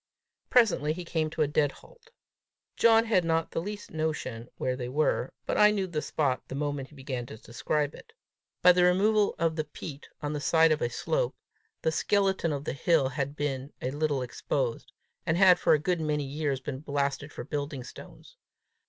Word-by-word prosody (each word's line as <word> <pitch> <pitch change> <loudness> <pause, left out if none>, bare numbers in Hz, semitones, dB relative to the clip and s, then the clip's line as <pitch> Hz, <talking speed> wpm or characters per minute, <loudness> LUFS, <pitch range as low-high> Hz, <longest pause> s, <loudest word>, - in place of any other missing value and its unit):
Presently, 180 - +3
he 175 +1 -7
came 160 -2 -1
to 155 0 0
a - - +1
dead 145 -1 +1
halt. 470 -2 -19 0.7
John 225 0 +5
had 215 -6 +3
not 165 -1 0
the - - -2
least 205 +3 -7
notion 150 -7 -3
where 130 - -1
they 125 -1 -5
were, 135 -2 +1
but - - -1
I 210 0 +8
knew 205 -2 0
the 165 -5 -3
spot 140 -5 0
the - - -6
moment 145 -2 -3
he 150 - -17
began 130 -3 -5
to - - -9
describe 145 +6 -2
it. - - -14 0.5
By 180 - +9
the 180 0 +3
removal 205 +4 +3
of 165 -3 +1
the 155 - -1
peat 150 -1 -9
on 145 0 -3
the 150 - -2
side 160 +3 +4
of 155 - +1
a 120 - +1
slope, - - -1 0.5
the 160 - +2
skeleton 190 0 +1
of 140 -1 -3
the - - -2
hill 140 0 +2
had 140 +1 -3
been 140 -1 -3
a 130 - -2
little 145 -2 0
exposed, 125 0 -3 0.3
and 160 - 0
had 185 -2 +7
for - - +4
a - - +5
good 170 +3 -1
many 150 -1 0
years 140 -1 -2
been 135 -1 -5
blasted 140 0 -2
for - - -7
building 145 0 -4
stones. - - -13
150 Hz, 195 wpm, -28 LUFS, 140-175 Hz, 0.7 s, By